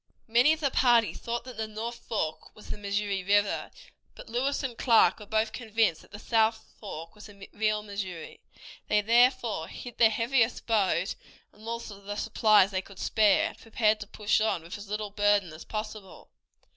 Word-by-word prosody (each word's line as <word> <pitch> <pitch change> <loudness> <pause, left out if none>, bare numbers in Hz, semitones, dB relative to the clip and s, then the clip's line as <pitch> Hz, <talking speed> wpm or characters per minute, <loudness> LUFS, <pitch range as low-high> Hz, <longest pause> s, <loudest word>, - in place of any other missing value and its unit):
Many 240 +6 +5
of 315 0 -1
the 280 -3 +1
party 240 -4 +3
thought 235 0 -4
that 250 -3 -10
the 220 0 -3
north 225 +2 -6
fork 160 -8 -4
was 215 - -12
the - - -5
Missouri 200 -1 -2
River, 205 +1 +1 0.5
but - - -12
Lewis 265 +5 -1
and 255 -3 -3
Clark 230 -6 +4
were 210 - -11
both 220 +1 0
convinced 220 -7 0
that - - -19
the 205 - -10
south 220 0 0
fork 165 -5 -8
was 210 0 -13
the 200 -1 -13
real 215 0 0
Missouri. 195 -5 -7 0.5
They 210 0 +3
therefore 235 -4 +2
hid 245 -2 -10
their 225 -2 +7
heaviest 230 +1 +1
boat 195 -5 +1 0.4
and 215 +1 -14
all 230 0 -2
the 205 -2 -8
supplies 210 -1 +3
they 185 -1 -1
could 190 0 -15
spare, 210 -3 +3
and - - -14
prepared 220 -1 +1
to 210 - -8
push 210 0 0
on 195 -6 0
with 170 - -8
as 205 0 -11
little 210 0 -3
burden 205 -4 +2
as 155 - -11
possible. 215 -2 -7
215 Hz, 185 wpm, -28 LUFS, 200-230 Hz, 0.5 s, their